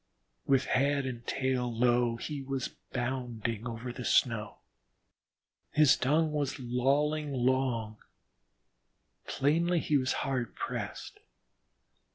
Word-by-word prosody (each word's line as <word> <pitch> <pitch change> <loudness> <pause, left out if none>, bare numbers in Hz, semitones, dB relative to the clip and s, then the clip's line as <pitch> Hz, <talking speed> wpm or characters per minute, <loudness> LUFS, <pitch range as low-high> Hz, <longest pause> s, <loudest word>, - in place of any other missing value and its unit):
With 135 -1 +3
head 140 +1 +1
and 120 -2 -6
tail 130 -2 0
low 120 0 +2
he 140 +4 -5
was 135 -1 -3 0.2
bounding 120 -3 -3
over 120 +1 -5
the 125 - -6
snow. 115 -4 +1 1.2
His 150 -3 +6
tongue 155 +5 +2
was 145 -3 -1
lolling 140 +4 +1
long; 125 -4 0 1.3
plainly 165 +5 +2
he 150 -2 +2
was 130 -1 0
hard 130 -4 -2
pressed. - - -5
130 Hz, 105 wpm, -30 LUFS, 120-140 Hz, 1.3 s, His